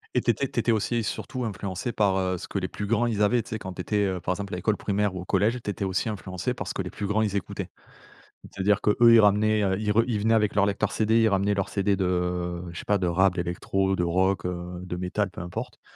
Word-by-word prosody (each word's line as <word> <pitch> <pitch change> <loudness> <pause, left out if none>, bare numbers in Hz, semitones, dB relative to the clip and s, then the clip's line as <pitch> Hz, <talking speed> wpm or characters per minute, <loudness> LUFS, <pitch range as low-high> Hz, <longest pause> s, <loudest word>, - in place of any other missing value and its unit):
Et - - +3
tu - - -2
étais - - +1
tu - - -3
étais 120 - +2
aussi 115 +2 0
surtout 130 +4 -4
influencé 100 0 -4
par, 100 -4 +2
heu, 95 -1 0
ce - - -8
que 100 - -2
les 95 - -2
plus 105 - -5
grands 115 +3 +1
ils 105 -2 +1
avaient. 120 +3 +3
Tu - - -13
sais, 110 - -3
quand 95 -1 -7
tu 90 - -5
étais, 105 +2 0
heu, 95 -2 -1
par 90 - 0
exemple, 100 -2 -6
à - - -2
l'école 105 +3 0
primaire 100 -1 -1
ou 90 - -4
au - - -9
collège, 115 +6 +1
tu - - -4
étais 100 - -5
aussi 95 +4 -1
influencé 95 -4 -3
par - - -6
ce - - -4
que - - -1
les - - -6
plus 100 - -4
grands, 110 +2 +1
ils 100 -2 -1
écoutaient. 100 - -4 0.8
C'est-à-dire 100 +1 0
qu'eux, 105 - +2 0.2
ils 115 - +8
ramenaient, 105 +1 +3
heu, 95 -1 +1
ils 105 -1 -1
re 115 +2 +4
ils 110 -4 -1
venaient 115 +2 +3
avec 105 -2 +2
leur 100 - +4
lecteur 100 -1 0
CD, 110 +1 +2
ils 110 - +4
ramenaient 100 +1 +1
leurs 100 -1 -1
CD 100 -1 +1
de, 90 -1 -1
je 85 - -8
sais - - -7
pas, 105 -1 +2
de 90 - 0
rap, 95 +1 +3
d'électro, 95 +2 -1
de 90 - 0
rock, 95 +3 +1
heu, 90 0 -5
de 90 -1 -5
métal, 90 +3 -1
peu 105 +1 -10
importe, 85 0 -6
100 Hz, 280 wpm, -26 LUFS, 90-105 Hz, 0.8 s, ils